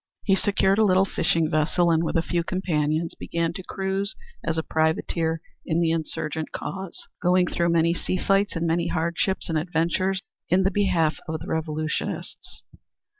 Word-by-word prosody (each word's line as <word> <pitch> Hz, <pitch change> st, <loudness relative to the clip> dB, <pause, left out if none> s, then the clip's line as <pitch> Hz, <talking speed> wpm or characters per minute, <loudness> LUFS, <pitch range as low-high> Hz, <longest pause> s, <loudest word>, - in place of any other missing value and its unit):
He 195 Hz, -, +3 dB
secured 195 Hz, 0 st, +2 dB
a -, -, +6 dB
little 190 Hz, -2 st, +4 dB
fishing 165 Hz, -3 st, +1 dB
vessel, 170 Hz, +3 st, +2 dB
and 165 Hz, 0 st, +3 dB
with -, -, -2 dB
a 165 Hz, -, +3 dB
few 170 Hz, -1 st, 0 dB
companions 165 Hz, -3 st, 0 dB
began 165 Hz, 0 st, -2 dB
to 190 Hz, -, -6 dB
cruise 195 Hz, +2 st, -2 dB, 0.3 s
as 165 Hz, 0 st, -1 dB
a 160 Hz, -, 0 dB
privateer 160 Hz, +1 st, 0 dB, 0.2 s
in 165 Hz, -1 st, 0 dB
the 165 Hz, -1 st, +2 dB
insurgent 160 Hz, -1 st, -3 dB
cause, 190 Hz, +4 st, -6 dB
going 180 Hz, +1 st, +4 dB
through 170 Hz, -1 st, 0 dB
many 170 Hz, 0 st, +3 dB
sea 185 Hz, -, -2 dB
fights 195 Hz, +2 st, +2 dB
and 165 Hz, 0 st, -1 dB
many 170 Hz, +1 st, +1 dB
hardships 170 Hz, +3 st, -1 dB
and 160 Hz, -2 st, +1 dB
adventures 175 Hz, +4 st, 0 dB, 0.3 s
in 185 Hz, +2 st, +4 dB
the 195 Hz, -, +2 dB
behalf 180 Hz, -7 st, +2 dB
of 160 Hz, -1 st, -3 dB
the -, -, -8 dB
revolutionists. 155 Hz, -1 st, -3 dB
170 Hz, 170 wpm, -25 LUFS, 160-190 Hz, 0.3 s, a